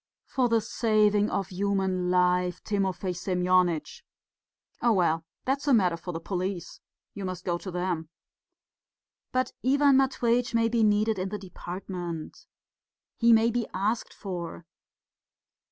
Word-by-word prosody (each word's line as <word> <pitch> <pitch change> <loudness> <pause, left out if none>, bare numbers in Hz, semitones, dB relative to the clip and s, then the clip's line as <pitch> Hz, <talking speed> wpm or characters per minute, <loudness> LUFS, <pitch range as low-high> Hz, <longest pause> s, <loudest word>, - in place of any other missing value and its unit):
"For 255 -3 0
the 230 -1 +3
saving 210 -2 +2
of 195 -2 -2
human 190 -1 0
life, 180 0 +2
Timofey 195 -2 -1
Semyonitch." 180 -2 +1 0.8
"Oh, 235 -1 +4
well, 165 -4 +2 0.2
that's 275 +3 -1
a 275 - +6
matter 180 -6 +3
for 170 +2 -6
the 165 - -4
police. 185 0 -4 0.3
You 200 - -6
must 185 -1 -5
go 175 -1 0
to 190 - -7
them." 175 -3 -2 1.2
"But 255 0 0
Ivan 280 +1 +4
Matveitch 245 -2 +1
may 230 0 +3
be 235 0 +1
needed 215 0 +2
in 190 +1 -2
the 210 - -4
department. 180 -3 -7 0.7
He 235 0 +4
may 225 +1 +5
be 235 -1 -1
asked 210 +5 -1
for." 175 -4 -6
195 Hz, 135 wpm, -27 LUFS, 180-225 Hz, 1.2 s, a